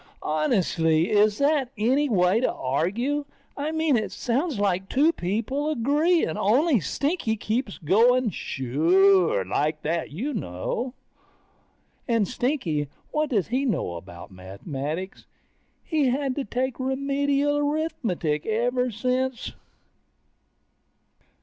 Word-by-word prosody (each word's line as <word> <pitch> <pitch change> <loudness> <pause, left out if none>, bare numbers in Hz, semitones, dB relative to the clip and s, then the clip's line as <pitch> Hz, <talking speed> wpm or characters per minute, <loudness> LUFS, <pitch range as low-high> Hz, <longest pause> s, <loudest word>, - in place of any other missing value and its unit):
Honestly, 160 0 +1
is 210 0 +4
that 280 -2 +2
any 265 +7 +2
way 185 -1 +3
to 255 - +1
argue? 205 - -1 0.3
I 290 +2 -3
mean 315 -3 +1
it 215 -2 -1
sounds 265 +3 -1
like 195 -1 0
two 300 +5 +3
people 230 - -2
agreeing, 300 - +1
only 255 - +3
Stinky 280 - -1
keeps 220 0 -2
going 230 +8 +3
suuure, 165 - +2
like 150 +9 -1
that, 165 +2 -1
you 240 - -4
know? 225 - -4 1.1
And 230 -5 +2
Stinky, 195 - -1 0.2
what 305 -1 0
does 215 - 0
he 255 +3 0
know 225 - -1
about 85 +1 -10
mathematics? 140 - -6 0.6
He's 295 -6 +1
had 270 0 -1
to 280 - -2
take 255 +4 -2
Remedial 280 +2 0
Arithmetic 265 - -1
ever 245 +3 +1
since 255 +3 -2
230 Hz, 110 wpm, -25 LUFS, 175-275 Hz, 1.1 s, is